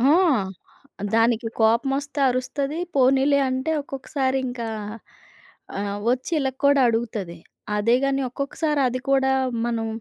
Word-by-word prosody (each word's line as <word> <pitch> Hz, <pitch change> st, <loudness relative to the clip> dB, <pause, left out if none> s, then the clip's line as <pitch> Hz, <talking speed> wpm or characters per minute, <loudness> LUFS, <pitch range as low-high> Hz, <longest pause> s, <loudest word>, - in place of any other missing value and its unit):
ఆ! 270 Hz, +4 st, +5 dB, 1.0 s
దానికి 230 Hz, 0 st, +2 dB
కోపమోస్తే 270 Hz, +6 st, +1 dB
అరుస్తది. 275 Hz, +4 st, -2 dB, 0.2 s
పోనీలే 270 Hz, +1 st, +4 dB
అంటే 260 Hz, +4 st, -1 dB
ఒక్కొక్కసారింకా 265 Hz, -3 st, -2 dB, 1.1 s
ఆహ్, 200 Hz, 0 st, -3 dB
వచ్చి 250 Hz, +5 st, 0 dB
ఇళ్ళ 275 Hz, -2 st, 0 dB, 0.2 s
కూడా 280 Hz, 0 st, +5 dB
అడుగుతది. 220 Hz, -6 st, -2 dB, 0.4 s
అదే 220 Hz, +3 st, +3 dB
గాని 275 Hz, 0 st, +1 dB
ఒక్కొక్కసారి 285 Hz, +3 st, -2 dB
అది 255 Hz, +1 st, -3 dB
కూడా 265 Hz, -1 st, +3 dB, 0.3 s
మనం 230 Hz, -1 st, -1 dB
260 Hz, 110 wpm, -23 LUFS, 235-275 Hz, 1.1 s, ఆ